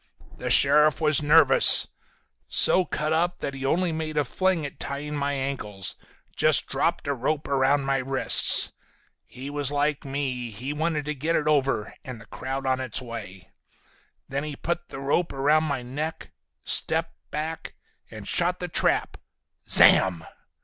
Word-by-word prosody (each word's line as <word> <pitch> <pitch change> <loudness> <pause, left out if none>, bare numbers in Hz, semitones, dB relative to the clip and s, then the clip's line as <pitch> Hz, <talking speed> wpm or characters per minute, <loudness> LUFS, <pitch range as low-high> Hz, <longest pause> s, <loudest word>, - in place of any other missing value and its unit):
The - - -4
sheriff 150 +1 +5
was 155 -2 +3
nervous. 150 -2 +6 0.6
So 185 - +3
cut 155 0 -2
up 175 +2 0
that 140 - -5
he 135 0 -8
only 170 +5 0
made 160 -1 -5
a 145 - +1
fling 185 +2 -1
at 140 - -9
tying 145 +2 -4
my 145 0 -2
ankles, 130 -8 -4 0.4
just - - +2
dropped - - -2
a 140 - 0
rope 150 +4 -3
around 140 +1 +1
my 135 0 0
wrists. 135 +1 +3 0.6
He 130 +2 -10
was 145 -1 -2
like 145 0 -1
me, 135 -3 -4
he 125 +7 -6
wanted 155 -1 -2
to 150 - -3
get 155 +4 -2
it 150 - 0
over, 135 -7 0
and 125 -3 -9
the 105 - -14
crowd 135 +5 -6
on 130 0 0
its 130 0 -3
way. 115 -7 -10 0.8
Then 140 +1 -4
he 150 -1 -6
put 170 +3 -4
the 135 - -8
rope 145 +5 -1
around 150 +3 +1
my 140 -5 -3
neck, 150 +6 -6 0.3
stepped 165 +1 -1
back 155 +2 -5 0.3
and 110 -2 -10
shot 180 +1 0
the 180 - -4
trap. 165 - 0 0.5
Zamm! 90 -4 +5
145 Hz, 160 wpm, -25 LUFS, 135-155 Hz, 0.8 s, nervous